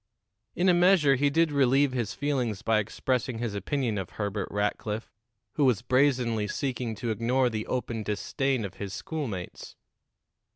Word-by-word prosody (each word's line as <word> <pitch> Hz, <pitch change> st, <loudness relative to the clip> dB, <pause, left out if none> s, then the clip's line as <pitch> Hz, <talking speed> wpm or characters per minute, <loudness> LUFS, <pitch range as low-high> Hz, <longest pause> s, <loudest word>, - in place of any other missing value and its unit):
In 180 Hz, -, +2 dB
a 180 Hz, -, +6 dB
measure 175 Hz, -5 st, +5 dB
he 140 Hz, +2 st, +2 dB
did 165 Hz, +2 st, +2 dB
relieve 140 Hz, 0 st, +3 dB
his 120 Hz, -5 st, -2 dB
feelings 125 Hz, -8 st, -1 dB
by 110 Hz, -1 st, +3 dB
expressing 125 Hz, +3 st, -1 dB
his 115 Hz, -2 st, -3 dB
opinion 110 Hz, +2 st, -1 dB
of 95 Hz, -, -5 dB
Herbert 100 Hz, -2 st, -2 dB
Rackliff, 105 Hz, +2 st, -2 dB, 0.5 s
who 145 Hz, -, +4 dB
was 120 Hz, -4 st, +2 dB
brazenly 125 Hz, -5 st, +2 dB
seeking 125 Hz, -3 st, -3 dB
to 115 Hz, +2 st, -3 dB
ignore 120 Hz, +3 st, +1 dB
the 110 Hz, -1 st, -3 dB
open 120 Hz, -3 st, -2 dB
disdain 115 Hz, -, -1 dB
of 95 Hz, -, -7 dB
his 100 Hz, -1 st, -5 dB
schoolmates. 120 Hz, -, -5 dB
120 Hz, 155 wpm, -28 LUFS, 105-140 Hz, 0.5 s, a